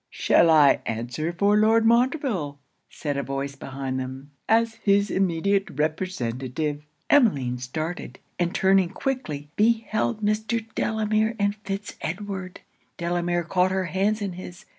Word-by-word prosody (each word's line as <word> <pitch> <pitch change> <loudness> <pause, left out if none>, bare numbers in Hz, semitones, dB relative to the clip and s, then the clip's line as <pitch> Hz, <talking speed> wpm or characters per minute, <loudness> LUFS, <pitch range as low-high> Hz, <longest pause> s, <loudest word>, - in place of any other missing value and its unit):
'Shall 170 - +3
I 150 -3 +6
answer 120 +8 -3
for 200 +4 +2
Lord 220 +1 +4
Montreville,' 235 - +1 0.3
said 145 -2 -4
a - - 0
voice 135 0 -4
behind 135 -1 -4
them, 130 +2 -7 0.2
'as 225 0 +2
his 200 0 +3
immediate 195 +2 +1
representative?' 150 -3 -2 0.3
Emmeline 140 - +3
started; 155 +7 -5 0.2
and 175 0 0
turning 190 -2 +4
quickly, 170 - -4
beheld 220 0 +1
Mr. 220 +2 0
Delamere 220 +1 0
and 205 -1 +1
Fitz 200 -1 -6
Edward. 190 +1 -5 0.4
Delamere 175 0 0
caught 180 +2 +2
her 190 0 -1
hands 200 +5 0
in 195 -3 -3
his. 175 0 -10
185 Hz, 130 wpm, -25 LUFS, 150-215 Hz, 0.4 s, I